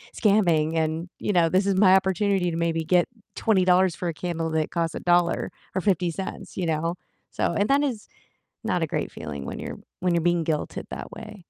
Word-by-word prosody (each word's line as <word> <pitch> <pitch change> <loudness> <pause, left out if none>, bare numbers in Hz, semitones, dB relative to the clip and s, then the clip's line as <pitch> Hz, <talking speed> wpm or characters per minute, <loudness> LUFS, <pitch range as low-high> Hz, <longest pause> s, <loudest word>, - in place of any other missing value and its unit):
scamming, 170 -7 +3
and, 160 +2 -1
you 205 - -1
know, 170 -2 +4
this 190 +3 +2
is 195 - +2
my 190 -1 +6
opportunity 190 -1 +2
to - - -3
maybe 165 -1 0
get 175 +1 +4 0.3
$20 185 -4 +3
for 180 - -3
a 170 - -1
candle 165 0 -3
that 160 -1 0
costs 165 -2 -1
a - - -3
dollar 175 -1 +2 0.2
or 190 - +1
50 180 -3 +1
cents," 190 +3 -6
you 180 - -2
know? 165 +2 0 0.4
So, - - 0
and 200 +4 +1
that 280 +1 +4
is 245 -7 -3 0.6
not - - 0
a - - +2
great - - -2
feeling 70 -2 -7
when - - -5
you're - - -6 0.2
when 180 -1 +1
you're 170 - +2
being 175 -1 +2
guilted 155 -1 -3
that - - -6
way. 215 -2 -9
175 Hz, 210 wpm, -25 LUFS, 165-190 Hz, 0.6 s, my